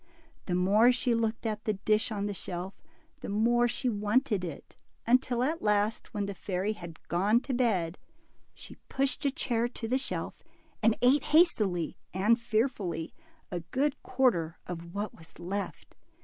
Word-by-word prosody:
The 180 - 0
more 205 +7 +5
she 250 -1 +1
looked 225 0 -1
at 215 -1 -2
the 215 - +1
dish 215 +4 +1
on 205 -2 -2
the 205 - -2
shelf, 180 0 -5 0.5
the - - -6
more 235 +4 +3
she 255 +2 -1
wanted 210 -1 +1
it, 165 -5 -7 0.3
until 245 0 +3
at 315 +5 -1
last, 210 +1 +1
when 205 -3 -2
the 200 - -4
fairy 190 +2 -2
had 170 -5 -11
gone 200 +7 +3
to 270 - -4
bed, 195 -9 +1 0.6
she - - -10
pushed 270 +1 0
a 280 - +3
chair 240 -3 0
to 240 -1 -6
the 255 +3 +1
shelf, 265 - -4 0.4
and 225 0 +3
ate 260 +3 +5
hastily 210 - +3 0.2
and 215 +5 +3
fearfully 215 -8 -1 0.4
a 175 - -2
good 270 - -1
quarter 180 -11 +1
of 170 0 -7
what 205 0 -3
was 160 -1 -17
left. 195 +4 -5
215 Hz, 165 wpm, -30 LUFS, 185-245 Hz, 0.6 s, more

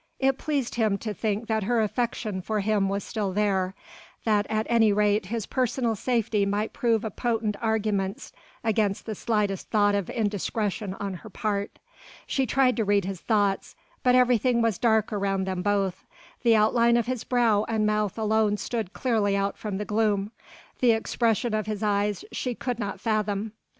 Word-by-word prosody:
It 270 0 +1
pleased 280 -5 -1
him 215 -4 +1
to 215 +1 -4
think 210 +2 -2
that 220 -1 0
her 240 +2 +2
affection 215 -3 -1
for 215 +2 -1
him 200 -1 +1
was 200 0 -2
still 205 -5 -3
there, 190 -2 0 0.5
that 210 -2 +2
at 220 0 0
any 225 -2 +4
rate 205 -1 +2
his 225 0 -3
personal 250 -2 0
safety 225 -2 0
might 205 +2 -1
prove 230 -2 +1
a 220 - -3
potent 225 -2 -1
argument 215 -3 -1 0.3
against 215 -3 0
the 220 - -3
slightest 210 -3 -1
thought 205 -2 +3
of 200 -3 -1
indiscretion 205 -2 -2
on 200 -1 -4
her 200 +5 -9
part. 205 0 -3 0.5
She 270 -2 0
tried 255 -1 +3
to 225 - +2
read 200 -2 +2
his 190 -2 -5
thoughts, 205 -3 0 0.3
but 250 0 +4
everything 250 -1 +3
was 230 -5 +1
dark 220 -2 +2
around 195 -1 0
them 185 -1 -2
both, 195 -1 0 0.4
the 235 -3 +5
outline 235 +2 +4
of 235 - +1
his 250 -1 -3
brow 230 -4 +2
and 220 -2 +1
mouth 210 -1 0
alone 215 -1 +2
stood 220 -3 -3
clearly 215 -5 +1
out 200 0 -1
from 205 -3 -4
the 210 - -3
gloom: 210 -1 0 0.5
the 240 -2 +5
expression 225 0 0
of 215 0 -1
his 215 0 -3
eyes 205 -1 0
she 250 -2 -3
could 245 0 -3
not 200 -3 -4
fathom. 215 -1 -1
215 Hz, 175 wpm, -26 LUFS, 200-230 Hz, 0.5 s, the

